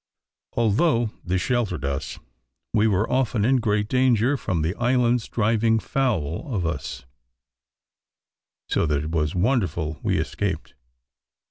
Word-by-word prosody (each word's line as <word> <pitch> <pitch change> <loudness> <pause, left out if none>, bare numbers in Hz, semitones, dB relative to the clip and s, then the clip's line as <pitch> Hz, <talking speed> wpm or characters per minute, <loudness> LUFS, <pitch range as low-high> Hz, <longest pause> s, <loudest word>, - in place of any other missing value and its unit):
Although 115 +1 +2
this 90 0 -1
sheltered 110 - -1
us, 70 -1 -3 0.6
we 110 0 +4
were 105 0 +1
often 125 -4 +1
in 130 +2 +4
great 105 -3 0
danger, 125 +1 +3
from 90 - -2
the 80 +3 0
islands 120 -1 +2
driving 115 0 +2
foul 110 - -1
of 95 -7 -1
us, 75 -7 -4 1.6
so - - +1
that 75 -1 0
it 75 - -5
was 75 -1 0
wonderful 85 - 0
we - - 0
escaped. 95 -6 -3
105 Hz, 125 wpm, -24 LUFS, 85-120 Hz, 1.6 s, we